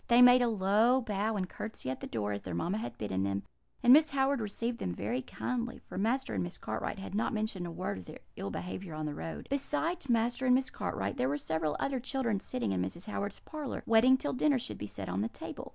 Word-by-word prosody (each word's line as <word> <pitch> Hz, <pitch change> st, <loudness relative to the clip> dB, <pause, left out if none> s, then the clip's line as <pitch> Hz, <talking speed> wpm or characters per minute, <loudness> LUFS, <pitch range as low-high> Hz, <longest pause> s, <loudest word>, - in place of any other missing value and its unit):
They 235 Hz, 0 st, +6 dB
made 250 Hz, 0 st, +8 dB
a 245 Hz, -, +4 dB
low 220 Hz, +4 st, +4 dB
bow 215 Hz, -2 st, -1 dB
and 190 Hz, -3 st, -1 dB
curtsey 210 Hz, -, -5 dB
at 130 Hz, -, -4 dB
the -, -, -5 dB
door, 105 Hz, -2 st, -2 dB
as 100 Hz, 0 st, -3 dB
their 90 Hz, -2 st, -5 dB
mamma 180 Hz, -, 0 dB
had 230 Hz, -, -5 dB
bidden 95 Hz, -3 st, -1 dB
them; 100 Hz, 0 st, 0 dB, 0.4 s
and 245 Hz, +2 st, +10 dB
Mrs. 310 Hz, +1 st, +6 dB
Howard 270 Hz, -1 st, +2 dB
received 230 Hz, +3 st, -2 dB
them 90 Hz, -, -2 dB
very 115 Hz, +7 st, -1 dB
kindly, 245 Hz, -, -3 dB
for -, -, -12 dB
Master 230 Hz, -, 0 dB
and 95 Hz, -3 st, 0 dB
Miss 85 Hz, -, -5 dB
Cartwright 110 Hz, -, -3 dB
had 195 Hz, 0 st, -7 dB
not 215 Hz, +2 st, 0 dB
mentioned 215 Hz, -5 st, -2 dB
a -, -, -5 dB
word 100 Hz, -, -3 dB
of 90 Hz, -, -11 dB
their -, -, -10 dB, 0.2 s
ill 100 Hz, -, -4 dB
behaviour 180 Hz, -, -5 dB
on 155 Hz, 0 st, -3 dB
the 150 Hz, -, -2 dB
road. 165 Hz, -, -6 dB
"Besides 300 Hz, +3 st, -1 dB
Master 240 Hz, +3 st, +2 dB
and 250 Hz, -, +7 dB
Miss 260 Hz, 0 st, +1 dB
Cartwright, 100 Hz, 0 st, -2 dB
there 130 Hz, -, +2 dB
were 145 Hz, -, 0 dB
several 155 Hz, 0 st, -1 dB
other 275 Hz, -2 st, 0 dB
children 245 Hz, -5 st, 0 dB
sitting 120 Hz, -, -2 dB
in 95 Hz, -1 st, 0 dB
Mrs. 95 Hz, -, -3 dB
Howard's 205 Hz, -2 st, -3 dB
parlour, 300 Hz, -4 st, -5 dB
waiting 230 Hz, +4 st, +6 dB
till 290 Hz, -, -2 dB
dinner 280 Hz, +2 st, +3 dB
should 250 Hz, +1 st, -4 dB
be 105 Hz, -, -4 dB
set 100 Hz, -2 st, -6 dB
on 95 Hz, +2 st, -1 dB
the 110 Hz, -, 0 dB
table. -, -, -7 dB
210 Hz, 245 wpm, -32 LUFS, -, 0.4 s, and